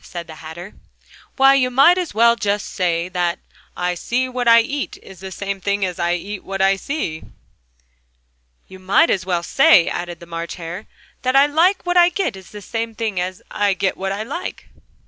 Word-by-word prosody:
said 170 -1 -7
the 160 -1 -11
Hatter. 170 +5 -9 0.6
"Why, 270 0 +6
you 260 -2 +2
might 275 +7 +6
just 360 -3 -2
as - - -12
well 235 +1 +5 0.2
say 175 -4 -2
that 175 -2 -1 0.4
'I 180 0 -1
see 245 +8 -1
what 250 -1 -3
I 230 0 +8
eat' 280 +4 -4
is 190 -2 -13
the 190 0 -8
same 195 0 -5
thing 200 +1 0
as 180 -2 -5
'I 170 0 +1
eat 195 +3 -6
what 195 0 -5
I 195 0 +4
see'!" 195 - -4 1.5
"You 190 - -13
might 195 - +3
just 190 - +1
as - - -12
well 175 -2 0
say," 275 - +5
added 175 -1 -4
the 170 - -12
March 170 0 -6
Hare, 175 +4 -7 0.3
"that 255 +1 0
'I 275 +1 +7
like 335 +7 +2
what 355 0 +1
I 350 0 +7
get' 360 - -2
is 190 -1 -13
the 210 -1 -10
same 225 +1 -4
thing 215 -4 -2
as 180 +1 -4
'I 205 -2 +1
get 190 0 -1
what 195 0 -3
I 200 +2 -3
like'!" 285 +10 -6
195 Hz, 205 wpm, -20 LUFS, 180-255 Hz, 1.5 s, I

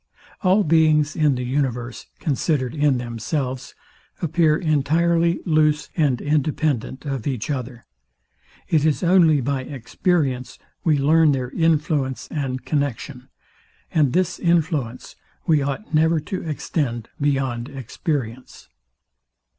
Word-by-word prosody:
All 195 +2 +4
beings 155 -2 +3
in 150 -4 +3
the 125 - -3
universe, 125 -2 -2
considered 140 -3 -1
in 145 -3 +2
themselves, 125 +3 -4 0.4
appear 160 -1 +2
entirely 170 +2 +1
loose 155 -2 +2
and 145 -7 +2
independent 145 -3 -1
of 135 -4 -3
each 130 0 -2
other. 125 -3 -5 0.8
It 155 -3 +2
is 155 +3 +1
only 170 -5 +5
by 135 +1 -1
experience 130 0 -2 0.3
we 160 -5 +3
learn 155 +2 +4
their 130 -2 -3
influence 150 -5 0
and 135 -4 -3
connexion; 140 -2 -3 0.6
and 150 -5 +2
this 185 +3 0
influence 160 -8 -1 0.3
we 155 -3 +3
ought 140 +8 -4
never 160 +1 +3
to 185 +5 -5
extend 130 -6 -2
beyond 135 -3 0
experience. 130 - -5
145 Hz, 115 wpm, -22 LUFS, 130-160 Hz, 0.8 s, only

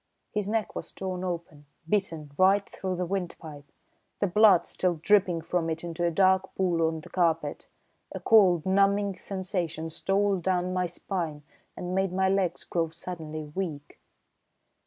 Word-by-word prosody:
His 210 -1 -1
neck 220 0 -1
was - - -6
torn 185 -1 -4
open, 170 -5 -5 0.2
bitten 165 -6 -1
right 195 +3 +4
through 190 -1 -4
to - - -2
the 180 0 -2
windpipe, 165 -6 -5 0.5
the - - +1
blood 200 -1 +5
still 180 -2 0
dripping 180 0 +3
from 165 0 -1
it 160 +1 -3
into 170 0 -4
a 170 - +3
dark 190 +2 +2
pool 175 -3 +1
on 160 -1 -3
the - - -13
carpet. 165 -4 0 0.4
A - - -5
cold, 185 -7 +5
numbing 200 +1 +2
sensation 180 -5 -3
stole 195 +4 +1
down 180 0 0
my 180 -1 0
spine 165 -4 -4 0.3
and 180 0 -4
made 190 0 +1
my 190 0 +2
legs 190 -3 0
grow 165 -2 -1
suddenly 160 -2 -7
weak. 155 -6 -5
180 Hz, 155 wpm, -28 LUFS, 165-195 Hz, 0.5 s, blood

